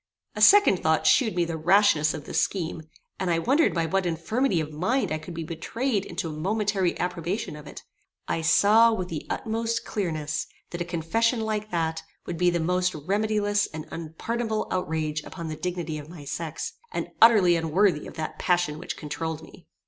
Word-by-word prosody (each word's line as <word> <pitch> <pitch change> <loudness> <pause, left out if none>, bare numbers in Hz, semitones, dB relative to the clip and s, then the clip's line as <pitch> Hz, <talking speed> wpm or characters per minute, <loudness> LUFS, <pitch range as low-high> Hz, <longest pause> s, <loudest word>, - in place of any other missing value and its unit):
A - - -4
second 405 - +7
thought 160 0 +2
shewed 225 -8 +4
me 175 -1 +2
the 165 -1 -4
rashness 170 -3 +4
of 145 - -8
this 160 - 0
scheme, 165 -2 -2 0.4
and 185 - -1
I 170 - +2
wondered 275 - +3
by 165 -2 0
what 185 +3 0
infirmity 175 +6 0
of 155 -1 -4
mind 185 - 0
I 155 - -1
could 170 +2 -9
be 165 - -4
betrayed 200 - -2
into 180 -1 -4
a - - -4
momentary 195 +2 0
approbation 180 +1 -3
of 150 - -11
it. - - -10 0.4
I 165 - -1
saw 210 +8 +5
with 185 -5 -3
the 155 -3 -5
utmost 230 +1 -2
clearness 155 -7 -2 0.2
that 175 - -5
a - - -1
confession 225 +8 0
like 215 -1 -2
that 160 -3 -1 0.2
would 170 - -4
be 180 0 +4
the 175 0 0
most 180 +2 +1
remediless 205 +5 0
and 155 0 -6
unpardonable 220 +8 -3
outrage 155 -4 -1
upon 170 -1 -7
the 155 - -4
dignity 165 -1 -4
of 150 +1 -11
my 165 -4 -10
sex, 155 - -4 0.2
and - - -3
utterly 210 -7 +7
unworthy 165 0 +1
of - - -11
that 160 -1 -5
passion 175 -4 +1
which - - -6
controuled 160 +1 -4
me. 160 +1 -15
175 Hz, 185 wpm, -26 LUFS, 160-205 Hz, 0.4 s, second